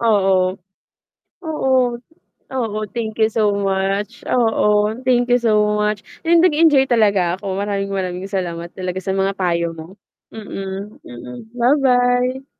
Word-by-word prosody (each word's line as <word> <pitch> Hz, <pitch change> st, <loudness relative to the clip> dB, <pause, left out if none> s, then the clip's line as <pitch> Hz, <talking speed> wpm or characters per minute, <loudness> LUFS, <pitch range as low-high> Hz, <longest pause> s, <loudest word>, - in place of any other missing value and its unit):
Oo. 190 Hz, -4 st, +2 dB, 0.8 s
Oo, 300 Hz, -4 st, -1 dB, 0.8 s
oo, 225 Hz, -5 st, -2 dB, 0.2 s
thank 225 Hz, -2 st, -4 dB
you 220 Hz, -, +4 dB
so 215 Hz, -2 st, +2 dB
much. 195 Hz, +3 st, -1 dB
Oo, 215 Hz, -3 st, +2 dB
thank 245 Hz, -1 st, +3 dB
you 245 Hz, -, +5 dB
so 230 Hz, -3 st, +1 dB, 0.2 s
much 210 Hz, -1 st, -1 dB, 0.2 s
and 335 Hz, 0 st, +5 dB
nag-enjoy 305 Hz, -5 st, +4 dB
talaga 200 Hz, -6 st, +2 dB
ako. 195 Hz, -1 st, -4 dB
Maraming-maraming 195 Hz, -2 st, -3 dB
salamat 170 Hz, -3 st, -4 dB
talaga 185 Hz, 0 st, -4 dB
sa 190 Hz, +1 st, -2 dB
mga 195 Hz, 0 st, 0 dB
payo 170 Hz, -2 st, 0 dB
mo. 165 Hz, +3 st, -11 dB, 0.4 s
Mm, 195 Hz, -1 st, -7 dB
mm, 125 Hz, 0 st, -10 dB, 0.2 s
ba-bye. 250 Hz, 0 st, +2 dB
210 Hz, 125 wpm, -19 LUFS, 190-240 Hz, 0.8 s, you